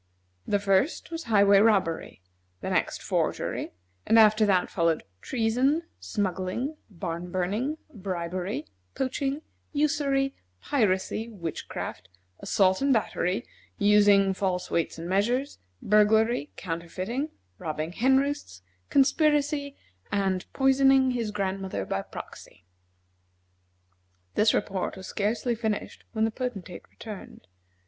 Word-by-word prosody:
The 205 - +3
first 200 - +1
was 330 -1 -5
highway 200 -2 +5
robbery, 195 - +1 0.4
the - - -3
next - - 0
forgery, - - -1 0.3
and 225 - +4
after 215 -1 +6
that 185 -3 +2
followed 165 -2 +1 0.2
treason, 255 +7 +1 0.2
smuggling, 200 - -2
barn 170 -2 -5
burning, 210 - -1 0.2
bribery, 180 - -3 0.3
poaching, 270 +3 -2 0.3
usury, 280 -2 +1 0.3
piracy, 215 - 0
witchcraft, 165 - -6 0.3
assault 190 +1 +2
and 275 0 +3
battery, 215 -2 0 0.3
using 205 -2 +5
false 185 -2 -2
weights 170 - 0
and 165 +1 -6
measures, 240 +9 0 0.2
burglary, 215 -4 +3
counterfeiting, 185 - -3 0.3
robbing 155 +1 -3
hen 260 +8 +3
roosts, 265 - -2 0.3
conspiracy, 290 0 +2 0.3
and 190 -2 0
poisoning 270 -1 +4
his 235 -3 -1
grandmother 190 - -2
by 95 - -2
proxy. 90 -1 -11 1.7
This 215 +1 +4
report 195 -1 -1
was 190 - -8
scarcely 220 +5 -1
finished 220 -2 -3
when 220 -1 +1
the 225 - 0
Potentate 205 -8 -6
returned. 210 - -10
210 Hz, 110 wpm, -27 LUFS, 185-260 Hz, 1.7 s, after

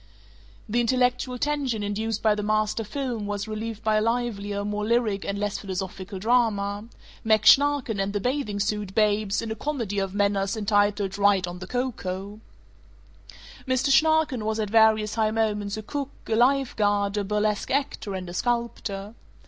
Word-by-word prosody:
The 235 +3 +1
intellectual 250 +1 +1
tension 270 -6 -1
induced 220 +2 -2
by 215 -1 +4
the 210 - -3
master 215 +1 0
film 235 -2 -4
was 205 0 -3
relieved 220 0 -5
by 215 -1 +2
a - - +2
livelier, 210 -3 -1
more 210 0 -2
lyric 220 -3 +1
and 200 - -3
less 205 0 -2
philosophical 190 0 -5
drama: 205 -2 +1 0.4
Mack 220 -1 +3
Schnarken 280 -6 +5
and 195 +1 -1
the 205 - -1
Bathing 250 -3 -2
Suit 205 -1 -2
Babes 210 -1 +2
in 225 - -4
a - - -2
comedy 230 -6 -2
of 195 0 -3
manners 200 0 +1
entitled 205 -1 +1
"Right 200 -2 +4
on 175 0 -7
the 185 - -8
Coco." 210 -5 -4 1.3
Mr. 260 +2 +1
Schnarken 315 -5 +3
was 220 +1 -1
at 210 -2 -2
various 220 -1 +4
high 220 -1 +1
moments 210 -2 -1
a 215 - -6
cook, 280 +4 -4 0.2
a 220 - 0
life 265 +3 +2
guard, 205 -1 +1
a 205 - 0
burlesque 210 +1 -1
actor, 265 -7 -2
and 185 -1 -5
a 175 - -7
sculptor. 220 -2 -2
215 Hz, 165 wpm, -25 LUFS, 200-235 Hz, 1.3 s, Schnarken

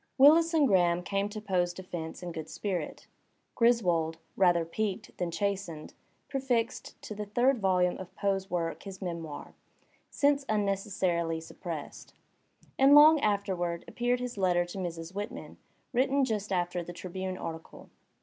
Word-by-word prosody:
Willis 320 +5 +7
and 300 -3 +5
Graham 175 -3 +3
came 200 +2 -1
to 215 +1 -6
Poe's 180 -4 0
defence 175 -2 -7
in 175 - -4
good 160 -1 -7
spirit. 180 -7 -4 0.5
Griswold, 175 -9 +2 0.2
rather 175 -3 +3
piqued 205 +4 -3
than 180 -1 -1
chastened, 180 -3 -3 0.3
prefixed 250 -4 -2
to - - -6
the 210 0 -5
third 245 +5 +2
volume 180 -2 +2
of 185 0 -9
Poe's 195 -1 -1
work 165 -2 -2
his 195 -2 -9
memoir, 170 -5 -6 0.6
since 285 0 +2
unneces 200 -3 -1
sarily 170 -3 +1
suppressed. 160 -2 -8 0.6
And 275 +2 +7
long 305 +1 +9
afterward 190 -6 -1
appeared 245 +1 0
his 245 -4 -5
letter 175 -2 +2
to 175 +3 -7
Mrs. 170 -1 -5
Whitman, 205 +4 -6 0.4
written 265 +2 +3
just 210 -4 -3
after 175 -1 0
the 175 - -8
Tribune 185 +1 -5
article. 165 -2 -8
190 Hz, 145 wpm, -30 LUFS, 175-215 Hz, 0.6 s, long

